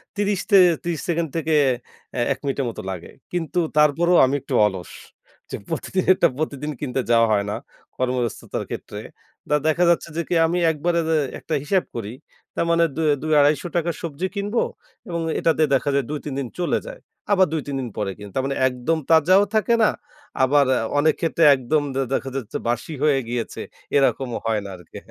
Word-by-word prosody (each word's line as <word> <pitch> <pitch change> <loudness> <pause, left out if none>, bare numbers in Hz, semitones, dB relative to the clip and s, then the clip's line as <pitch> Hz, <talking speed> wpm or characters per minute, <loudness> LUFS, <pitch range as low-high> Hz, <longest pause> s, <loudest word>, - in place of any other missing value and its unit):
৩০ 205 -1 0
তে 200 - +7 0.3
৩০ 170 -3 -2
সেকেন্ড 170 -2 0
থেকে 160 0 -1 0.6
এ - - 0
১ - - -13
মিনিটের 135 -1 -1
মতো - - -7
লাগে। 90 -3 -7 0.2
কিন্তু 175 0 -1 0.2
তারপরেও 165 +4 +4
আমি 135 +2 0
একটু - - -7
অলস। 95 -4 -3 0.6
যে, - - -2
প্রতিদিনেরটা 185 0 +2
প্রতিদিন 150 -1 -3
কিনতে 130 -2 -2
যাওয়া 115 -1 +5
হয় 100 -1 +2
না, 105 - -2 0.4
কর্মব্যস্ততার 125 -2 -2
ক্ষেত্রে। - - -6 0.5
তা 150 - +3
দেখা 160 +3 +2
যাচ্ছে 170 -1 +1
যে, 170 - +1
কি? 175 - 0
আমি 175 +2 -1
একবারে 170 +3 0
যে 160 - +3 0.2
একটা 160 - -5
হিসাব 185 +5 +1
করি, 110 -2 -5 0.4
তার - - 0
মানে 170 0 +4
দু 160 - -2 0.2
২০০/২৫০ 150 +1 +3
টাকার 170 -1 0
সবজি 170 +2 -3
কিনবো 205 +3 0 0.5
এবং 170 -1 -2 0.2
এটাতে 160 -1 +2
দেখা 140 +2 +2
যায়, 140 -3 +1
২-৩ 150 -1 -4
দিন 135 - -3
চলে 175 - +1
যায়। - - -8 0.3
আবার 190 -2 +5
২-৩ 145 -3 -3
দিন 125 -2 -4
পরে 105 -2 -1
কিনি। 105 -1 -10
তার 130 - 0
মানে 135 - -2
একদম 130 +6 -1
তাজাও 170 +5 +5
থাকে 215 +2 +2
না। - - +5 0.5
আবার 140 +2 +4 0.3
অনেক 155 +1 +4
ক্ষেত্রে 165 0 +1
একদম 130 +4 0
দে 135 - +1
দেখা 135 - -1
যাচ্ছে 125 -5 -4
বাসি 120 +6 -2
হয়ে 145 -3 +3
গিয়েছে। 120 -1 -4 0.4
এরকমও 135 -3 +1
হয় 110 -2 0
না - - -6
আরকি। 90 -3 -13
150 Hz, 180 wpm, -22 LUFS, 130-170 Hz, 0.6 s, তে